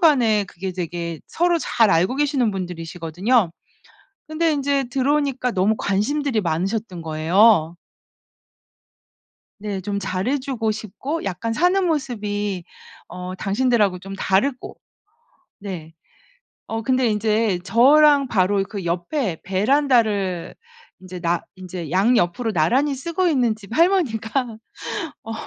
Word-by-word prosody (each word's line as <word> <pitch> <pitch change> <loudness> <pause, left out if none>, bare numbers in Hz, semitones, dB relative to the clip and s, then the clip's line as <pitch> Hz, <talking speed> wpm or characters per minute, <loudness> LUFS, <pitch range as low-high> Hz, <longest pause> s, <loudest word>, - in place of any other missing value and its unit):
간에 240 -10 +4
그게 190 0 -6
되게 170 -2 -4
서로 345 0 +1
잘 230 -8 +2
알고 180 +10 +2
계시는 280 -5 +1
분들이시거든요. 180 +3 -1 0.8
근데 320 +1 +1
인제 280 -1 0
들어오니까 270 -1 0
너무 195 +2 +2
관심들이 230 +5 0
많으셨던 185 +2 -2
거예요. 165 +2 +3 1.8
네 205 -2 -4
좀 200 +2 -3
잘 185 +1 -2
해 285 +2 +1
주고 255 -5 -2
싶고 225 - -5
약간 200 +4 -3
사는 360 +9 +2
모습이 210 - -2 0.4
어 180 +1 -7
당신들하고 205 -2 +1
좀 195 +2 -8
다르고. 220 +8 -1 0.8
네 175 -5 -7 0.8
어 225 0 -2
근데 255 +1 +1
인제 215 -2 +1
저랑 280 +5 +5
바로 195 -2 +2
그 195 -1 -6
옆에 175 - -2
베란다를 205 - +1 0.5
인제 185 -1 -9
나 170 0 0
인제 180 -4 -7
양옆으로 215 +3 +2
나란히 255 - +2
쓰고 335 +7 -1
있는 250 -9 +2
집 215 +1 -10
할머니가 255 - +1 0.7
어 225 - -5
215 Hz, 250 characters per minute, -22 LUFS, 185-265 Hz, 1.8 s, 저랑